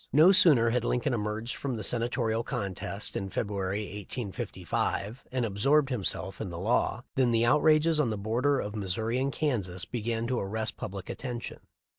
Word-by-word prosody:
No 155 Hz, +7 st, +7 dB
sooner 140 Hz, -12 st, +6 dB
had 125 Hz, 0 st, +1 dB
Lincoln 125 Hz, +1 st, 0 dB
emerged 110 Hz, +1 st, -2 dB
from 135 Hz, -3 st, -3 dB
the 110 Hz, -, -4 dB
Senatorial 115 Hz, 0 st, +1 dB
contest 100 Hz, 0 st, -4 dB
in 95 Hz, -, -3 dB
February, 100 Hz, -1 st, -2 dB
1855, 105 Hz, +2 st, -4 dB
and 125 Hz, -2 st, 0 dB
absorbed 135 Hz, +8 st, +2 dB
himself 95 Hz, -5 st, -2 dB
m 105 Hz, -, -3 dB
the 85 Hz, -, -6 dB
law, 115 Hz, +5 st, 0 dB
than 130 Hz, -2 st, +3 dB
the 115 Hz, 0 st, +3 dB
outrages 155 Hz, +4 st, +4 dB
on 140 Hz, -6 st, +2 dB
the 110 Hz, -, -2 dB
borders 125 Hz, +7 st, +1 dB
of 105 Hz, +1 st, -6 dB
Mis 95 Hz, -4 st, -1 dB
souri 115 Hz, +3 st, -1 dB
and 135 Hz, +1 st, 0 dB
Kansas 100 Hz, -, -1 dB
began 115 Hz, -1 st, -2 dB
to 125 Hz, +1 st, 0 dB
arrest 110 Hz, +2 st, -1 dB
public 95 Hz, -2 st, -6 dB
attention. 120 Hz, -3 st, -5 dB
115 Hz, 170 wpm, -29 LUFS, 100-125 Hz, -, No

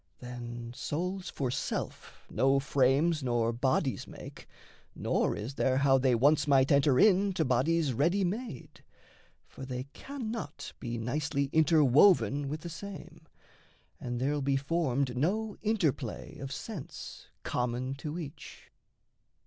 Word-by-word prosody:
Then, 120 Hz, -1 st, -7 dB
souls 180 Hz, +7 st, -3 dB
for 130 Hz, -3 st, -2 dB
self -, -, -4 dB
no 135 Hz, +5 st, +2 dB
frames 140 Hz, +4 st, +2 dB
nor 120 Hz, -2 st, +1 dB
bodies 130 Hz, +1 st, 0 dB
make, -, -, -11 dB, 0.5 s
Nor -, -, 0 dB
is 110 Hz, +6 st, -5 dB
there 130 Hz, -1 st, +1 dB
how 135 Hz, -1 st, +4 dB
they 130 Hz, -2 st, +3 dB
once 145 Hz, +5 st, +3 dB
might 135 Hz, -1 st, +4 dB
enter 140 Hz, -2 st, +4 dB
in 200 Hz, -1 st, +4 dB
To 160 Hz, -3 st, 0 dB
bodies 140 Hz, +3 st, +2 dB
ready 170 Hz, -, +2 dB
made 195 Hz, -, -5 dB, 0.6 s
for -, -, -11 dB
they 125 Hz, -1 st, -4 dB
cannot 230 Hz, -, -6 dB
Be 120 Hz, -2 st, -4 dB
nicely 140 Hz, +4 st, -1 dB
interwoven 145 Hz, -, +4 dB
with 155 Hz, +2 st, -4 dB
the 175 Hz, -, -7 dB
same, 170 Hz, -2 st, -9 dB, 0.7 s
And 120 Hz, -1 st, -4 dB
there'll 145 Hz, +3 st, 0 dB
be 135 Hz, 0 st, +1 dB
formed 140 Hz, -3 st, 0 dB
no 205 Hz, -, 0 dB
interplay 165 Hz, -, -1 dB
of 135 Hz, 0 st, -6 dB
sense -, -, -7 dB, 0.2 s
Common 125 Hz, +2 st, -2 dB
to 150 Hz, +3 st, -5 dB
each. 155 Hz, -2 st, -9 dB
140 Hz, 130 wpm, -30 LUFS, 125-165 Hz, 0.7 s, how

